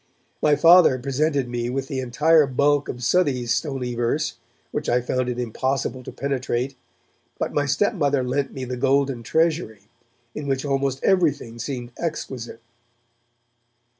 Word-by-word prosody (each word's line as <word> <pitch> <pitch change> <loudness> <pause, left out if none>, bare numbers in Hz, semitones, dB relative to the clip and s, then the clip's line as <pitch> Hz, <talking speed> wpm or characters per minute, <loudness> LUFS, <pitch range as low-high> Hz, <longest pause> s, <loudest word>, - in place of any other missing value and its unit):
My 150 -1 +4
Father 165 -2 +6
presented 140 +1 0
me 120 0 -3
with 135 +1 -3
the 135 -1 -3
entire 150 +5 +3
bulk 140 +2 +1
of 125 0 -5
Southey's 125 -6 +2
stony 125 -1 -2
verse, 120 +6 -1 0.3
which - - -3
I 120 - +3
found 125 +1 -1
it 125 - -3
impossible 130 +2 -2
to - - -8
penetrate, 135 -1 -2 0.6
but - - -3
my 145 -1 +1
stepmother 145 - +1
lent 135 +2 -1
me 130 -1 -5
The 125 0 -4
Golden 135 -1 +1
Treasury, 160 - 0 0.5
in 150 -1 -6
which 135 0 -1
almost 135 -1 -1
everything 145 -11 +1
seemed 125 -1 -5
exquisite. 130 -8 -5
135 Hz, 140 wpm, -23 LUFS, 125-145 Hz, 0.6 s, Father